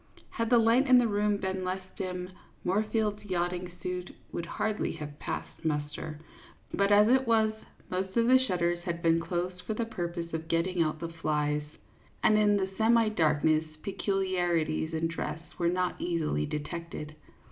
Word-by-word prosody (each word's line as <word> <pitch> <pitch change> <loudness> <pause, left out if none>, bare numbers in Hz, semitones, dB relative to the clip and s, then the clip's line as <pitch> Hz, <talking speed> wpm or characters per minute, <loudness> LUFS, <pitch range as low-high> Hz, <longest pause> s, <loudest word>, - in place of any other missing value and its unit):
Had 230 -1 -1
the 240 - +6
light 230 +4 +4
in 255 -1 +8
the 245 -1 +4
room 205 -1 +1
been 190 -1 -2
less 185 +1 -2
dim, 180 -1 -4 0.3
Moor 190 +4 +2
field's 210 -2 0
yatching 180 -2 -2
suit 180 0 -3 0.2
would 170 - -4
hardly 215 0 -1
have 145 -1 -8
passed - - -5
muster; 150 0 -2 0.6
but 200 0 +2
as 205 +1 +7
it 260 +1 +4
was, 220 -1 +3 0.4
most 190 +3 -2
of 230 - +4
the 260 +2 +6
shutters 175 -8 0
had 170 -1 -4
been 165 0 +4
closed 180 +2 -3
for 220 - -3
the 230 - -1
purpose 170 -5 -4
of 160 0 -3
getting 170 +2 +1
out 155 -1 +1
the 170 +1 -5
flies, 150 -1 +1 0.6
and 215 - +5
in 210 -1 +4
the 190 -1 -1
semi 225 0 +5
darkness 155 -4 +2 0.2
peculiarities 180 -5 0
in 160 0 -1
dress 165 -1 -3 0.2
were 170 -1 +3
not 180 0 -1
easily 160 - 0
detected. 155 0 -5
180 Hz, 170 wpm, -30 LUFS, 165-210 Hz, 0.6 s, in